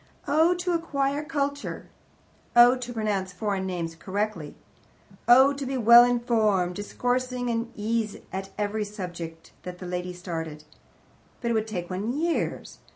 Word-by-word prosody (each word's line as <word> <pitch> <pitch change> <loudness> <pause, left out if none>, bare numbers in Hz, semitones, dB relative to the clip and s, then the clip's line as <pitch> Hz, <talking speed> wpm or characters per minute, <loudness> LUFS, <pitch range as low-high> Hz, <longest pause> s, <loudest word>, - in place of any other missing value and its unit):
Oh 320 +5 +4
to 355 0 -2
acquire 290 -4 -1
culture! 285 -2 -3 0.7
Oh, 240 +1 +8
to 250 -1 -6
pronounce 210 -5 -1
foreign 195 0 -2
names 170 -3 -3
correctly! 190 -2 -3 0.7
Oh, 260 +3 +7
to 280 0 -5
be 265 0 -2
well 235 0 +9
informed, 220 -7 +2
discoursing 245 +3 -1
at 230 +1 -1
ease 220 0 -1 0.2
on 190 +1 -2
every 210 +1 -1
subject 175 -5 -7
that 180 0 -8
a 185 - -7
lady 180 0 -4
started! 160 -4 -6 0.8
But 235 -1 -1
it - - +2
would 220 -1 0
take 180 -4 -5
one 215 +9 -2
years. 335 +1 -2
220 Hz, 145 wpm, -26 LUFS, 185-255 Hz, 0.8 s, well